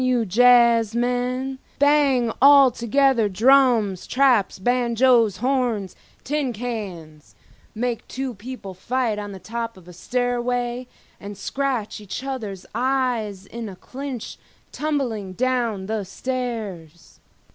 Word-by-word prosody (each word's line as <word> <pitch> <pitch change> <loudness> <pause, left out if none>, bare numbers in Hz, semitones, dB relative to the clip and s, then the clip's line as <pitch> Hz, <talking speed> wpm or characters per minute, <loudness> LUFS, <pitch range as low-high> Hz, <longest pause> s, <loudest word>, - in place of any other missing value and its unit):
you 250 -2 +2
jazzmen, 245 +3 +3 0.2
bang 280 -5 +3
altogether 270 -3 +5
drums, 230 -3 +3
traps, 255 -6 +2
banjoes, 235 -1 +2
horns, 245 -6 -1 0.3
tin 290 -2 -1
cans—make 215 +2 -6
two 265 -1 -4
people 220 -2 -8
fight 230 +2 -1
on 205 -1 -6
the 195 - -8
top 230 +2 -5
of 180 -2 -17
a 180 - -11
stairway 245 +3 -2 0.3
and 200 0 -8
scratch 260 -6 -3
each 210 +5 -6
other's 220 -9 -5
eyes 240 -5 -1
in 230 +1 -7
a 190 - -9
clinch 260 +2 -7 0.3
tumbling 250 -11 -2
down 235 -4 -1
the 215 0 -2
stairs. 195 - -6
240 Hz, 105 wpm, -22 LUFS, 205-255 Hz, 0.3 s, altogether